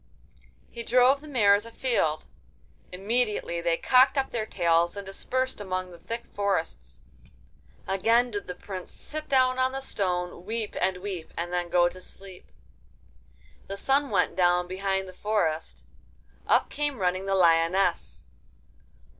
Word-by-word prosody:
He 235 - -7
drove 250 +4 +4
the 305 - -12
mares 205 -7 +4
afield. 230 -10 -1 0.7
Immediately 205 -2 -1
they 170 -1 +1
cocked 260 +2 +4
up 270 -1 0
their 220 -2 -2
tails 170 0 +1
and 200 - -6
dispersed 255 +5 -3
among 185 -2 -3
the 170 - -13
thick 230 +7 -6
forests. 165 - -3 0.8
Again 230 +6 +2
did 205 -1 -5
the 180 - -5
Prince 185 -1 -8
sit 310 0 -8
down 255 -1 +3
on 260 0 +1
the 270 - -3
stone, 180 -8 -2
weep 220 +2 -3
and 185 0 +1
weep, 185 -5 -5
and 175 +1 -3
then 175 -1 -1
go 175 0 +4
to 185 +1 -8
sleep. 190 0 -11 1.2
The 195 - -5
sun 275 +6 +1
went - - +1
down 180 -1 +3
behind 190 +1 -2
the 185 - -10
forest. 180 -6 -2 0.6
Up - - +3
came 290 -2 -2
running 185 0 -1
the 195 - +1
lioness. 170 - +2
195 Hz, 145 wpm, -27 LUFS, 180-235 Hz, 1.2 s, drove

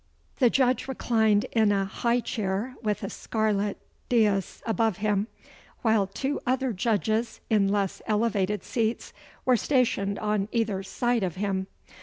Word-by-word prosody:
The 245 - +6
Judge 255 +1 +2
reclined 220 -5 +2
in 220 -3 +3
a 195 -1 +1
high 235 +5 0
chair, 210 +3 -2
with 210 -2 -1
a 195 - -3
scarlet 210 -2 -1 0.3
dais 210 -6 +1
above 225 -3 +1
him, 210 0 0 0.6
while 220 -4 +3
two 270 +8 -2
other 260 0 0
Judges, 220 +2 0
in 205 -3 +4
less 200 -1 0
elevated 210 -2 +1
seats, 230 -1 -2 0.3
were 255 - +5
stationed 225 -6 +1
on 210 -1 -1
either 220 -5 0
side 240 +5 0
of 180 -4 -2
him. 190 -1 -1
215 Hz, 140 wpm, -27 LUFS, 200-235 Hz, 0.6 s, The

